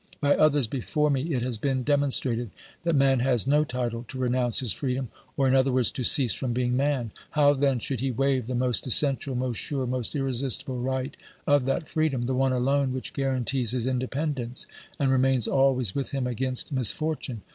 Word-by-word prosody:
By 145 -1 +3
others 145 -3 +3
before 145 +5 -1
me 135 0 0
it 120 - -1
has 120 -3 -1
been 130 +1 -1
demon 145 +1 +1
strated 120 -3 0 0.3
that 170 -1 0
man 135 -2 +3
has 125 -2 +2
no 145 +3 +3
title 120 -4 -3
to 130 - -8
renounce 125 -2 0
his 125 -5 0
freedom, 130 -2 -3 0.3
or, 135 - +2
in 130 - +2
other 135 0 +3
words, 125 -2 +2
to 130 - -4
cease 120 -3 +5
from 125 -3 -3
being 125 0 0
man; 135 -4 0 0.3
how 145 -1 +5
then 135 -2 +1
should 125 +1 -4
he 135 +2 -1
waive 130 -1 0
the 125 - -3
most 125 +1 0
essential, 135 +1 +2
most 125 -2 -2
sure, 135 +2 -2
most 125 +2 -3
irresistible 135 -1 0
right 130 +2 -3 0.3
of 145 -2 +3
that 140 +4 -1
freedom, 155 -6 -1
the 130 - -1
one 135 +1 +1
alone 130 +1 +1
which 130 - -6
guarantees 130 -3 -1
his 125 -2 -1
independence 130 0 -2 0.3
and 135 -2 +1
remains 130 -2 +2
always 130 -6 +2
with 140 -1 -3
him 135 -2 -2
against 125 +3 -2
mis 130 -5 +4
fortune 155 -8 -4
130 Hz, 200 wpm, -26 LUFS, 125-140 Hz, 0.3 s, cease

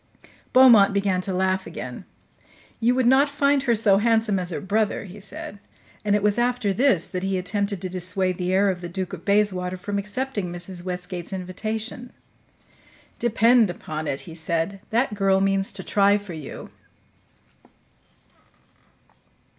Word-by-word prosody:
Beaumont 230 -6 +7
began 195 -2 +1
to 190 - -3
laugh 190 +1 0
again. - - -8 0.7
"You 240 +2 +2
would 260 -1 +1
not 265 +4 +5
find 280 0 +2
her 245 -3 +2
so 205 -3 +4
handsome 220 -2 +2
as 180 -1 -3
her 170 - -3
brother," 210 +2 -1
he 195 +2 -11
said; 200 0 -8 0.4
and 205 -1 +2
it 210 - 0
was 210 +2 +2
after 245 -4 0
this 235 - +3
that 180 - -5
he 190 0 -1
attempted 200 +1 -2
to - - -2
dissuade 185 0 -1
the 180 0 -1
heir 195 +1 +3
of 180 -1 -6
the 175 - -6
Duke 185 +1 -5
of 170 -3 -7
Bayswater 190 -3 +1
from 200 +2 -3
accepting 210 -2 -3
Mrs. 175 0 -3
Westgate's 180 -1 -5
invitation. 215 +6 -5 1.1
"Depend 230 -1 +4
upon 155 -3 -5
it," 135 - -3
he 165 - -11
said, 165 +4 -2
"that 235 +1 +1
girl 195 -2 +2
means 195 0 +1
to 190 -1 -7
try 200 +1 +3
for 200 -3 -9
you." 155 -4 -9
195 Hz, 155 wpm, -24 LUFS, 185-220 Hz, 1.1 s, Beaumont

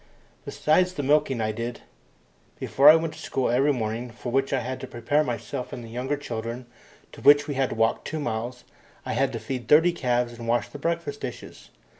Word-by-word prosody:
Besides 180 +4 +2
the 145 - -4
milking 135 -3 +2
I 110 0 0
did, 115 +2 -5 0.8
before 140 - +5
I 155 - +10
went 165 -1 -1
to - - -12
school 130 -3 -1
every 135 +4 +3
morning, 115 -1 -3
for 120 +1 -7
which 135 +2 +1
I 135 - +1
had 130 +2 -4
to - - -7
prepare 125 +6 0
myself 125 0 -4
and 120 - -7
the 115 - -10
younger 130 +5 -2
children, 120 -2 -5 0.4
and - - -32
to - - -12
which 145 0 +6
we 145 - -2
had 135 -1 0
to - - -4
walk 115 0 +1
two 160 - -4
miles. 120 -2 -4 0.4
I - - -2
had 135 +4 +1
to 115 - -3
feed 125 +2 -5
thirty 165 +4 +6
calves 125 -6 0
and 115 - -7
wash 120 +1 +1
the 145 - -9
breakfast 165 -2 -2
dishes. 125 - -8
130 Hz, 215 wpm, -25 LUFS, 120-145 Hz, 0.8 s, I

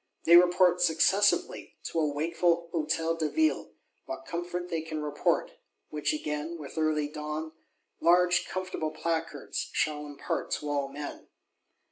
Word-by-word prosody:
They 170 - +7
report, 180 0 +5
successively, 200 - +2
to 165 - -2
a 155 -2 +1
wakeful 170 +3 0
Hôtel 165 +1 0
de 155 -2 0
Ville 315 -1 0 0.3
what - - -6
comfort 175 +1 -4
they 165 -1 -1
can 155 -1 -5
report; 150 -1 0 0.4
which 150 0 -1
again, 150 +2 -3
with 150 -3 -9
early 155 -2 +1
dawn, 150 +1 -5 0.5
large 175 +1 +4
comfortable 185 -4 -3
Placards, 160 -2 -3
shall 150 -1 -1
impart 145 -1 -4
to 150 - -3
all 140 -1 0
men. 145 +1 -8
160 Hz, 135 wpm, -29 LUFS, 150-175 Hz, 0.5 s, They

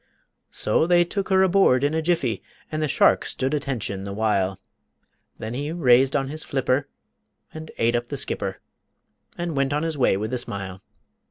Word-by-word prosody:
So 130 +9 +1
they 175 0 +4
took 195 +2 -3
her 190 0 +4
aboard 185 -9 +4
in 145 +2 +1
a 160 - +1
jiffy, 155 -9 0 0.3
And 155 0 -2
the 155 - +1
shark - - +3
stood 130 +2 -2
attention 120 -9 -2
the 100 0 -5
while, 100 -3 0 0.8
Then 110 +1 -5
he 145 +4 -3
raised 135 -5 +4
on 135 -2 +1
his 155 +2 -6
flipper 135 0 0 0.7
and 155 0 -8
ate 115 +1 +2
up 120 0 -1
the - - -5
skipper - - -3 0.8
And 175 -2 -3
went 140 0 +1
on 150 +2 0
his 160 -3 -2
way 125 - +3
with 110 +4 -4
a 125 - 0
smile. 95 -5 -6
135 Hz, 180 wpm, -24 LUFS, 115-160 Hz, 0.8 s, they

